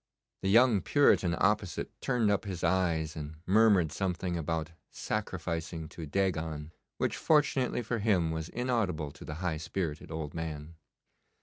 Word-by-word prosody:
The 95 - 0
young 115 -1 +5
Puritan 95 -9 +3
opposite 100 -2 0
turned 120 -5 +2
up 100 - 0
his 95 -4 -5
eyes 85 -3 +1
and 75 0 -6
murmured 100 -6 +4
something 90 -1 -2
about 80 0 -2 0.2
'sacrificing 80 -1 -3
to 80 -2 -8
Dagon,' 80 -4 -1 0.3
which - - 0
fortunately 145 -5 +2
for 115 +1 -2
him 95 -6 +2
was 80 +1 -4
inaudible 110 - -1
to 70 - -13
the 75 - -6
high 80 -3 0
spirited 80 -1 -4
old 80 -2 -5
man. 80 -1 -5
85 Hz, 140 wpm, -30 LUFS, 80-105 Hz, 0.3 s, young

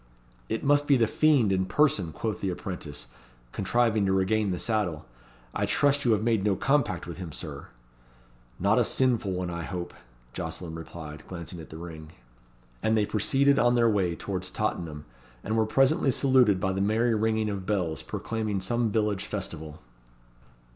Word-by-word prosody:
"It 110 - -2
must 145 0 +3
be 140 - +5
the 115 - +4
Fiend 135 -3 +3
in 95 -1 +1
person," 100 - +2
quoth 110 +7 -4
the 95 - 0
apprentice, 85 -7 -5 0.5
contriving 110 +1 +1
to - - +2
regain 100 +2 +2
the 90 - -1
saddle. 90 -8 -1 0.5
"I 100 - 0
trust 140 +7 +2
you 120 - +5
have 105 0 0
made 115 -4 +2
no 100 -2 +2
compact 135 -8 +1
with 85 -1 -7
him, 90 -3 -6
Sir." - - -7 0.9
"Not - - +3
a - - +4
sinful 120 -6 +1
one 90 -1 -2
I 85 0 -4
hope," 90 +1 -5 0.4
Jocelyn 85 -3 -5
replied, 80 -2 -8
glancing 85 -1 -7
at 80 - -10
the 80 - -9
ring. 80 -2 -9 0.7
And 110 0 +2
they 105 - +3
proceeded 135 +7 +2
on 120 0 +4
their 120 -1 +4
way 95 -5 +1
towards 95 -1 -4
Tottenham, 80 -9 -3 0.4
and 110 - -1
were 110 -1 +2
presently 135 +5 +3
saluted 130 -7 +4
by 95 0 0
the 95 - -1
merry 110 +4 +2
ringing 110 0 +1
of 95 -2 -5
bells, 85 -9 -1
proclaiming 110 -3 -3
some 120 +4 0
village 105 -2 0
festival. 75 -2 -6
100 Hz, 170 wpm, -27 LUFS, 90-115 Hz, 0.9 s, be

